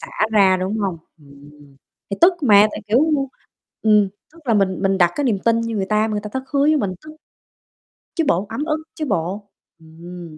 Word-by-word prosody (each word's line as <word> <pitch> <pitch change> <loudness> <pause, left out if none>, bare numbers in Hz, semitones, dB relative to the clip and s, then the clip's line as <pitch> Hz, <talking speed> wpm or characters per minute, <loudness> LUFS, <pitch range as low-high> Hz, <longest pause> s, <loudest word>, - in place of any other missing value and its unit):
xả - - -9 0.2
ra, 195 -3 +5
đúng 195 +4 -2
hông? 190 -5 -2 0.2
Ừm. 140 -1 -17 0.6
Thì 200 - -2
tức 355 +2 +7
mà 210 -4 +6
tại, - - -7
kiểu 225 +4 +3 0.8
ừm, 210 -2 +4 0.2
tức 335 - -18
là 230 - +2
mình 195 -2 +1
mình 195 0 +1
đặt 175 -1 +4
cái 290 - -2
niềm 220 -7 +1
tin 230 0 +3
như 230 -1 -3
người 195 - -1
ta 215 +1 +1
mà - - -3
người 210 - -1
ta 210 - -7
thất 265 - -3
hứa 280 - +1
với 305 +2 +4
mình, 195 -9 -2
tức 310 - -10 1.1
chứ 330 - +1
bộ, 185 +4 +1
ấm 250 +7 -3
ức 310 0 -2
chứ 310 - -3
bộ. 200 - -3 0.3
Ừm. 165 0 -11
205 Hz, 215 wpm, -20 LUFS, 185-230 Hz, 1.1 s, tức